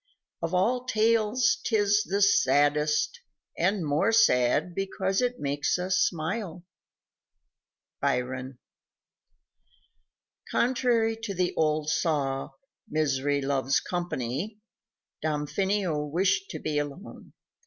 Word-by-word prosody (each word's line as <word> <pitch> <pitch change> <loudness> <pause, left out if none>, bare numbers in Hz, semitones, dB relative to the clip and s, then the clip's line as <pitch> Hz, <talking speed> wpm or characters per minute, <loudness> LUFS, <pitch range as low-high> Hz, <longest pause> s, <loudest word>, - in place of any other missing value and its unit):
Of 165 +2 -2
all 245 +7 +1
tales 225 0 +2
'tis 205 -2 +2
the 200 -1 0
saddest 150 - +2 0.3
and 185 0 0
more 145 +9 +2
sad 175 - +3
Because 190 +1 -1
it 245 0 -1
makes 145 +3 0
us 185 +1 0
smile. 180 +1 -2 1.4
Byron. 130 +1 -2 1.9
Contrary 240 -3 +1
to 220 -3 -5
the 180 0 0
old 155 -1 +1
saw, 140 -5 -1 0.4
"Misery 145 -3 0
loves 135 -1 +1
company," 175 - -4 0.6
Damfino 155 +1 -1
wished 190 +4 +1
to 155 - -5
be 150 -1 -2
alone. 145 +8 -8
175 Hz, 95 wpm, -27 LUFS, 145-205 Hz, 1.9 s, sad